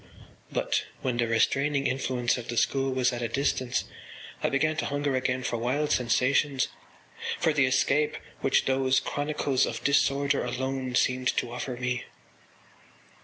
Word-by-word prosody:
But - - 0 0.2
when 125 -2 0
the 120 -1 +1
restraining 140 +5 +1
influence 125 -2 0
of 120 -1 -6
the 120 - -4
school 135 +2 +1
was 130 -1 +1
at 120 - -4
a 120 - 0
distance 130 -1 0 0.6
I - - +1
began 155 +3 +1
to - - -1
hunger 145 -1 -1
again 130 0 0
for 120 - -1
wild 135 +6 0
sensations, 130 +3 +2 0.7
for 160 -2 +2
the 140 -3 +3
escape 135 +3 +2 0.2
which 135 - +2
those 130 0 +2
chronicles 145 -2 0
of 115 - -5
disorder 140 0 +2
alone 130 +1 -3
seemed 130 0 +2
to 120 - -1
offer 125 0 -4
me. 125 0 -2
130 Hz, 150 wpm, -27 LUFS, 125-140 Hz, 0.7 s, the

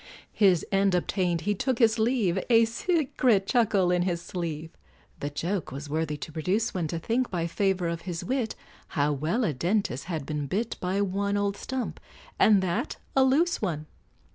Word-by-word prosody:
His 190 -6 +4
end 195 -1 +3
obtained, 180 -1 0
he 205 - 0
took 255 +5 -1
his 230 -1 +3
leave, 220 -6 +2
A 230 -1 +6
secret 250 - +1
chuckle 200 -6 +2
in 180 0 +2
his 175 -1 0
sleeve; 165 -3 -5 0.5
The 145 - -3
joke 170 +5 -3
was 140 +2 -7
worthy 155 -1 -1
to 155 - -7
produce 185 +8 0
one, 175 -4 -1
To 165 - -3
think, 235 +9 0
by 170 -3 -1
favor 185 0 0
of 170 0 -3
his 170 -1 -5
wit 250 -2 -1 0.4
How 145 +1 +3
well 160 - 0
a 165 - +1
dentist 170 - -1
had 160 -5 -4
been 150 -1 -3
bit 215 - -1
By 185 +2 0
one 200 +1 0
old 200 0 0
stump, 260 +3 -4 0.4
and 205 -3 +5
that 175 -2 -2 0.2
a 265 - +6
loose 310 +7 +2
one! 160 -7 -2
190 Hz, 180 wpm, -27 LUFS, 165-220 Hz, 0.5 s, A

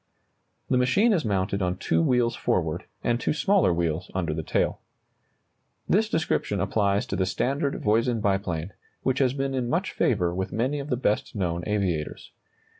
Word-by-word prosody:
] - - -46
The 125 - +4
machine 200 - +3
is 175 - +1
mounted 100 -1 0
on 90 0 0
two 80 -2 +1
wheels 120 +6 +2
forward, - - -1 0.2
and 120 0 +1
two - - 0
smaller 190 - +3
wheels 85 0 -1
under 85 -4 -1
the 80 - -2
tail. - - 0 1.1
This 215 +3 +2
description 160 - 0
applies 100 -1 +1
to - - -3
the 95 0 0
standard 140 - -1
Voisin 115 +2 +2
biplane, 95 -4 -1 0.3
which 130 - +1
has 130 -2 +3
been 135 -1 -1
in 125 -2 -1
much - - 0
favor 85 -1 +1
with 95 +1 -3
many 130 +6 0
of 140 +1 -6
the 125 - 0
best 110 -4 0
known 85 -4 -1
aviators. 95 -7 -2
105 Hz, 175 wpm, -26 LUFS, 90-130 Hz, 1.1 s, The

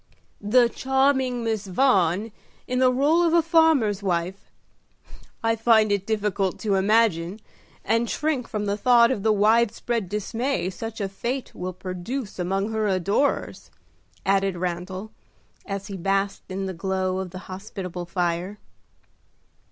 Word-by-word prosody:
"The 235 +4 +4
charming 265 -1 +1
Miss 220 -3 -2
Vaughan 195 -2 +2 0.3
in 250 0 -1
the 255 -1 +5
role 290 +7 +3
of 340 -1 +3
a 335 - +4
farmer's 315 - +3
wife. 180 0 -2 0.9
I 225 0 +2
find 220 -2 +4
it 200 -1 -1
difficult 210 -3 -1
to 210 -3 0
imagine, 195 -2 +2 0.5
and 230 +1 +1
shrink 295 -6 -1
from 210 -2 -3
the 200 0 -1
thought 235 +2 +5
of 220 - -2
the 220 +2 +3
wide 215 +2 +4
spread 230 -4 -3
dismay 210 +1 -2
such 225 +4 -7
a 200 - -1
fate 240 +7 -4
will 180 +1 -5
produce 190 +6 -5
among 195 +4 -1
her 220 -1 0
adorers," 200 +9 0 0.6
added 195 -1 +1
Randal, 185 +4 -4 0.6
as 195 -1 -4
he 200 -1 -6
basked 195 +2 -1
in 190 +1 -3
the 190 - -4
glow 185 +1 -1
of 190 -1 -4
the 185 - -9
hospitable 185 -2 -7
fire. 175 +3 -2
205 Hz, 145 wpm, -24 LUFS, 190-235 Hz, 0.9 s, the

